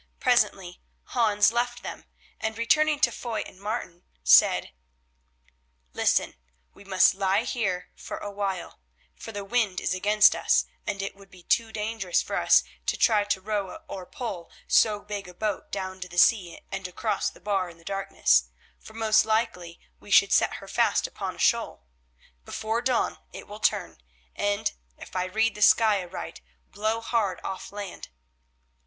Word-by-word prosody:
Presently 210 -8 +1 0.3
Hans 210 -4 +4
left 240 +1 -2
them, - - -7 0.3
and, 220 0 -3
returning 305 +6 +3
to - - +4
Foy 230 -3 -4
and 185 - -14
Martin, 200 -5 -5 0.2
said: 60 - +5 1.2
"Listen: - - +1 0.4
we - - -16
must 190 -2 +4
lie 195 +2 +1
here 205 -8 -2 0.3
a 205 - -6
while, 195 -3 -4 0.3
for 225 - -9
the 205 -2 -6
wind 210 -4 0
is 180 - -1
against 210 +3 +4
us, - - +2 0.2
and 200 -1 -2
it 195 - -5
would 195 0 -17
be 185 -2 -16
too 225 +5 +1
dangerous 210 -4 -1
for - - -4
us - - +5 0.2
to - - 0
try 215 -3 +4
to 205 -2 -1
row 205 0 -3
or 190 -10 -7
pole 235 - -6 0.2
so 210 -2 +3
big 205 -2 -6
a 180 - -12
boat 210 0 -3
down 190 -1 -4
to 180 - -5
the 175 - -10
sea 180 -3 +3
and 190 -1 -4
across 210 +4 -1
the - - -18
bar 195 -3 -1
in 170 - -14
the 165 - -20
darkness, 195 - +2 0.3
for 220 - -14
most 220 -1 +4
likely 220 -6 -1 0.2
we - - -15
should - - +5
set - - +3
her - - -10
fast - - +2
upon - - -5
a - - -18
shoal. 60 - 0 0.6
Before 220 - -2
dawn 250 -1 0
it - - -9
will 210 +1 -9
turn, - - 0 0.4
and, 205 0 0 0.3
if - - -12
I 180 0 0
read 220 +4 +1
the 210 - -10
sky 215 -2 +5
aright, 175 -1 -8 0.3
blow 215 +3 -1
hard 220 -5 0
off 190 -1 -6
land." 200 -2 -7
205 Hz, 165 wpm, -26 LUFS, 185-225 Hz, 1.2 s, said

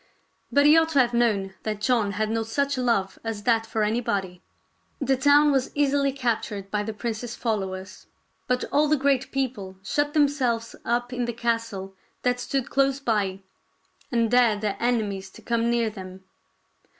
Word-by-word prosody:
But 285 0 +4
he 300 +2 +7
ought 325 0 +4
to 280 - +4
have 245 -2 +3
known 210 -5 +1
that 215 -1 -3
John 215 -3 +1
had 215 +2 -1
no 225 0 0
such 280 +6 -1
love 230 -7 0
as 225 -2 -4
that 225 -1 +2
for 220 -1 -1
anybody. 200 -5 -1 0.6
The 270 -1 +2
town 290 +2 +5
was 265 -2 +1
easily 285 -1 +2
captured 220 -6 -2
by 210 - 0
the 215 +1 -3
prince's 225 +2 -4
followers; 190 -4 -4 0.4
but 250 0 +1
all 300 +1 +3
the 305 +1 +3
great 275 -1 +1
people 235 -9 -3
shut 290 +8 -1
themselves 260 -6 +1
up 240 +1 -1
in 245 -1 -1
the 240 - -3
castle 230 -4 -2 0.3
that 245 0 +1
stood 245 +1 -2
close 275 0 +2
by, 205 -7 -1 0.7
and 230 -2 +1
dared 235 -4 +4
their 210 -2 -1
enemies 210 -5 -1
to - - -15
come 235 0 0
near 235 -2 +1
them. 190 -2 -10
235 Hz, 170 wpm, -25 LUFS, 210-265 Hz, 0.7 s, he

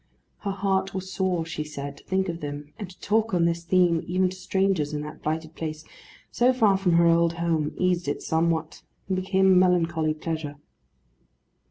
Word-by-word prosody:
Her 200 - -4
heart 195 0 -1
was 190 0 -5
sore, 185 -3 0
she 155 -2 -4
said, 145 -2 -7
to - - -16
think 190 0 0
of 170 -1 -4
them; 145 0 -6
and 200 -4 -6
to 185 - -16
talk 220 -1 +1
on 170 -1 +3
this 170 0 0
theme, 175 -1 +3
even 185 +1 +2
to 185 - -8
strangers, 185 -5 0
in 150 - -2
that 150 +1 -9
blighted 160 +1 -3
place, 155 -1 -5 0.5
so 250 +2 +3
far 220 -6 +4
from 190 -2 +1
her 170 0 +5
old 170 0 +4
home, 165 -3 -1
eased 180 -2 +1
it 145 - -2
somewhat, 160 -1 0 0.3
and 190 - 0
became 190 +1 +1
a 190 -1 +6
melancholy 170 -4 +2
pleasure. 155 -2 -4
170 Hz, 190 wpm, -25 LUFS, 160-190 Hz, 0.5 s, a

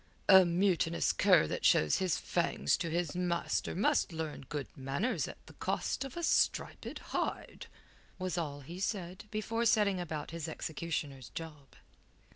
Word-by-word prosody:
"A 190 -1 +9
mutinous 170 -1 +2
cur - - +5
that - - -4
shows 75 - +4
his 185 -3 +1
fangs 70 - +1
to 170 - -3
his 170 0 -1
master 175 -1 -1
must 190 -1 +2
learn 160 -5 -5
good 145 -2 -3
manners 140 - -1
at - - -8
the - - -14
cost - - -2
of 270 +3 -8
a 340 - -3
striped - - +1 0.2
hide," - - -3 0.5
was 185 -2 -2
all 145 -4 -3
he 170 +6 -9
said 190 -2 -3
before 225 +2 -1
setting 210 -4 +3
about 155 -4 -4
his 165 -1 -4
executioner's 150 -6 -4
job. 150 -4 -7
170 Hz, 150 wpm, -33 LUFS, 150-190 Hz, 0.5 s, A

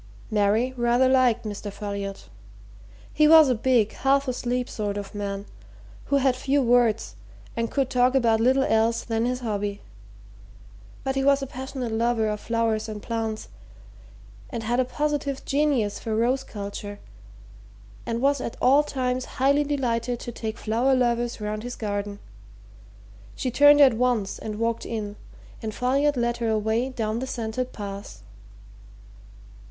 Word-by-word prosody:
Mary 215 +4 +2
rather 240 +2 +3
liked 250 -3 +3
Mr. 205 -1 -5
Folliot. 200 -1 -5 0.9
He 305 0 +4
was 315 -2 +8
a - - +4
big, 235 -2 +2
half 275 +1 +1
asleep 250 0 -1
sort 205 -2 -3
of 200 -1 -6
man, 200 -1 -4 0.6
who 280 - 0
had 270 -2 +3
few 275 +2 +1
words 235 -2 +2 0.4
and 230 -1 -1
could 270 -2 -1
talk 250 +1 +3
about 230 -4 +3
little 260 +4 +3
else 225 -1 +2
than 225 0 -1
his 250 0 -2
hobby. 205 -3 -2 1.2
But 265 - -1
he 270 0 0
was 280 0 +3
a - - -1
passionate 260 -2 -5
lover 225 0 +1
of 210 0 -3
flowers 225 -1 -1
and 210 -1 -7
plants, 225 -2 -3 1.0
and 235 -2 -5
had 240 +3 0
a 255 - +3
positive 285 0 -2
genius 275 -8 +1
for 220 -2 -3
rose 250 +4 +1
culture, 205 0 -7 1.1
and 230 0 -3
was 280 0 +2
at 235 - -5
all 275 +4 +5
times 255 -3 -2
highly 280 +3 +3
delighted 245 -4 -1
to 240 - -6
take 220 -1 -5
flower 240 +5 +1
lovers 240 -1 0
round 210 0 -3
his 245 +2 -6
garden. 205 -1 -3 1.2
She 255 - -2
turned 290 +3 +7
at 265 -4 +7
once 230 -4 0
and 215 -1 -5
walked 230 0 -1
in, 210 -3 -4 0.5
and 215 -2 -5
Folliot 275 +3 +1
led 240 0 0
her 230 -1 -1
away 220 +3 0
down 225 -3 -2
the 260 - -4
scented 245 +1 -3
paths. 200 - -8
235 Hz, 150 wpm, -25 LUFS, 220-260 Hz, 1.2 s, was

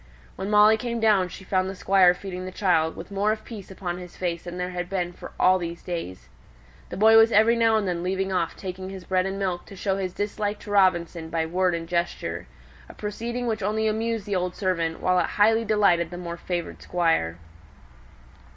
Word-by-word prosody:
When 190 +1 -4
Molly 210 +1 +6
came 235 0 -3
down 210 -4 +3
she 190 - -10
found 185 0 0
the 195 - -6
Squire 185 -1 +4
feeding 185 -1 -6
the 185 - -6
child, 165 -5 +1
with 170 - -9
more 200 +2 +1
of 215 0 -3
peace 210 -5 -9
upon 180 -2 -5
his 180 -1 -11
face 170 -2 -3
than 175 0 -6
there 180 0 -3
had 175 0 -4
been 180 -2 -2
for - - -10
all 185 0 +5
these 170 -1 -6
days. 165 - -6 0.6
The - - -6
boy 220 +2 +7
was 225 +1 +6
every 220 +2 +5
now 225 -1 +3
and 215 -3 +1
then 175 -1 -1
leaving 190 +1 -1
off 170 -3 -1
taking 185 0 -6
his 190 -1 -8
bread 185 +1 0
and 195 0 -4
milk 185 -3 -2
to 195 - -11
show 195 +1 -1
his 185 -2 -3
dislike 205 0 -2
to 205 - -8
Robinson 175 -4 +2
by 165 0 -1
word 180 +1 +1
and 165 0 -5
gesture: 170 0 -2 0.4
a - - -12
proceeding 235 +4 -4
which 220 -2 -1
only 215 +2 0
amused 225 0 -1
the 205 -2 -2
old 180 0 -1
servant, 170 -5 -1
while 185 0 +3
it - - +1
highly 225 +2 +4
delighted 200 -6 +3
the 175 - -7
more 170 -1 -5
favoured 175 0 -5
Squire. 165 - 0
185 Hz, 215 wpm, -25 LUFS, 175-210 Hz, 0.6 s, boy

